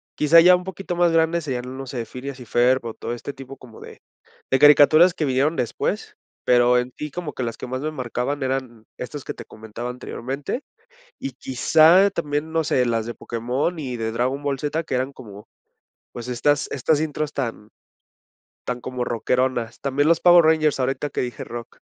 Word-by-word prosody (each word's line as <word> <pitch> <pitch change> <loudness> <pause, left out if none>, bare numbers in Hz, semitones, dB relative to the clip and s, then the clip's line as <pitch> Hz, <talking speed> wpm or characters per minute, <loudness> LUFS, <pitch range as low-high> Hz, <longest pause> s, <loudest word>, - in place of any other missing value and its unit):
Quizá 155 +3 +6
ya 180 +1 +7
un 180 - -4
poquito 190 -1 -5
más 175 -1 +3
grande 165 +1 +2
seria, 130 -5 -3
no 130 +1 -7
sé, 120 -3 -4
Phineas 130 +2 -8
y 125 - -10
Ferb, 125 +1 +2
o 115 - -4
todo 120 - -5
este 140 +4 -7
tipo 135 0 -11
como 120 -4 -14
de - - -12 0.5
de 130 - +3
caricaturas 150 +4 +7
que 155 - -1
vinieron 140 +4 +1
después, 125 -3 -3 0.3
pero 125 0 +4
en 125 +1 -2
si 150 - -5
como 165 0 -6
que - - -6
las 115 -2 -3
que - - -7
más 130 +1 -4
me 155 - -2
marcaban 130 0 -3
eran 130 -4 -3
estas 140 +2 -6
que - - -5
te - - -11
comentaba 110 +3 -8
anteriormente, 135 - -5 0.6
y 135 - -4
quizá 160 +9 +4
también, 150 -2 -3
no 165 0 +1
sé, 125 -3 +1
las 115 -1 -1
de 120 - -5
Pokémon 125 +9 -3
y 125 -4 -4
de 110 -1 -2
Dragon 130 +5 -1
Ball 140 -2 -1
Z, 155 +2 -2
que - - -6
eran 130 +2 -1
como 105 -5 -12 0.7
pues, 120 0 -7
estas 145 +4 +1
estas 150 +3 +1
intros 155 -1 -3
tan 115 -5 -4 1.0
tan 125 -1 -3
como 125 -1 -4
rockeronas. 120 0 -1
También 140 +2 +1
los 170 - +4
Power 175 -1 +7
Rangers 155 -3 +3
ahorita 135 +3 -1
que - - -3
dije 125 -1 -5
rock. 120 -1 -9
130 Hz, 195 wpm, -22 LUFS, 125-150 Hz, 1.0 s, ya